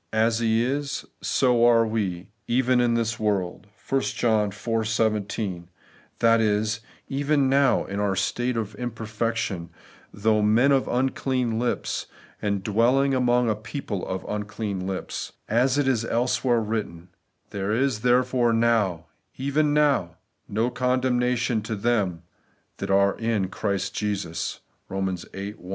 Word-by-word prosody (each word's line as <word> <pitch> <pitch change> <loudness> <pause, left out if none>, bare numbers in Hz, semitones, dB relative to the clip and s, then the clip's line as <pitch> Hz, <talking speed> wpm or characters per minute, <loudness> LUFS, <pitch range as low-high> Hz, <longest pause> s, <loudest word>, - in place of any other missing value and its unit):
' - - -47 0.2
As 115 0 0
He 115 0 +2
is, 140 +1 -2 0.2
so 125 -3 +2
are 115 -1 +5
we 100 -5 -2 0.2
(even) 125 +1 +3
in 120 -1 +2
this 115 -1 -1
world' 100 -2 -1 0.2
(1 135 0 +2
John 110 -5 +1
iv. 115 +2 -2
17), 105 -5 -1 0.5
that 115 0 +4
is, 105 0 +1 0.3
even 140 0 +1
now, 135 0 +3
in 100 - -4
our 100 -2 +1
state 120 +5 -1
of 110 -1 -3
imperfection, 115 -5 -3 0.4
though 110 +1 +1
men 115 +6 +4
of 135 -1 +2
unclean 125 -2 0
Kps, 120 0 -2 0.3
and 100 -2 -1
though 105 - -3
dwelling 130 +6 +3
among 125 -1 +2
a 110 - +3
people 110 -2 -5
of 95 0 -3
unclean 105 -2 -3
lips; 95 -1 -4
as 125 +5 +2
it 145 -2 +2
is 125 -4 +2
elsewhere 120 0 +1
written, 105 -6 -4 0.2
' - - -46
There 100 0 -2
is 125 0 +1
therefore 125 -1 +3
now 110 -7 +2 0.3
(even 145 +2 +1
tiow) 140 - +2 0.3
no 115 +4 0
condemna 125 0 +1
tion 115 -1 0
to 110 +1 -4
them 100 -6 0 0.5
that - - -5
are 100 0 +3
in 110 -5 0
Christ 100 -1 -2
Jesus 100 -6 -3
' - - -44
(Eom. 95 -2 -3
viii 100 +1 -5
1). 90 -3 -14
115 Hz, 150 wpm, -25 LUFS, 105-125 Hz, 0.5 s, are